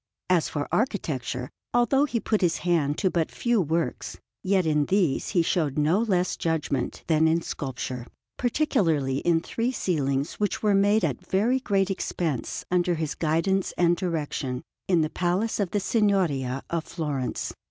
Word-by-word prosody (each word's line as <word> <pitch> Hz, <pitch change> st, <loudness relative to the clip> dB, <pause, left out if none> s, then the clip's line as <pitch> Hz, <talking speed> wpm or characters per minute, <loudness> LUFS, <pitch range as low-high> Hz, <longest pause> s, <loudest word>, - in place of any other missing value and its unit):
As 175 Hz, -3 st, +3 dB
for 145 Hz, -1 st, -3 dB
architecture, 135 Hz, -, -1 dB, 0.2 s
although 270 Hz, +4 st, +4 dB
he 245 Hz, -5 st, -1 dB
put 215 Hz, -1 st, 0 dB
his 175 Hz, -3 st, +2 dB
hand 155 Hz, -4 st, +2 dB
to 190 Hz, -3 st, +1 dB
but 165 Hz, -2 st, 0 dB
few 235 Hz, -3 st, +1 dB
works, 165 Hz, +1 st, -2 dB, 0.2 s
yet 190 Hz, -1 st, +2 dB
in 150 Hz, -2 st, +2 dB
these 185 Hz, -7 st, +1 dB
he 175 Hz, -, +2 dB
showed 155 Hz, -5 st, 0 dB
no 155 Hz, +6 st, +3 dB
less 185 Hz, -6 st, +1 dB
judgment 150 Hz, -6 st, -2 dB
than 160 Hz, 0 st, +3 dB
in 165 Hz, +1 st, +2 dB
sculpture; 130 Hz, -3 st, -5 dB, 0.3 s
particularly 175 Hz, -, +1 dB
in 165 Hz, 0 st, +2 dB
three 230 Hz, +7 st, -2 dB
ceilings 140 Hz, -, -1 dB
which 210 Hz, +1 st, -1 dB
were 210 Hz, -1 st, +4 dB
made 200 Hz, 0 st, +4 dB
at 140 Hz, -6 st, -3 dB
very 230 Hz, +7 st, +2 dB
great 195 Hz, -5 st, +1 dB
expense, 165 Hz, -8 st, -3 dB
under 180 Hz, -1 st, +2 dB
his 160 Hz, -2 st, -2 dB
guidance 170 Hz, +4 st, 0 dB
and 175 Hz, -1 st, +4 dB
direction, 150 Hz, -7 st, -3 dB, 0.2 s
in 175 Hz, -3 st, +3 dB
the 155 Hz, -, 0 dB
Palace 185 Hz, +6 st, 0 dB
of 200 Hz, -3 st, 0 dB
the 205 Hz, -, 0 dB
Signoria 180 Hz, -, +1 dB
at 170 Hz, -2 st, 0 dB
Florence. 145 Hz, -7 st, -3 dB
170 Hz, 160 wpm, -26 LUFS, 150-200 Hz, 0.3 s, although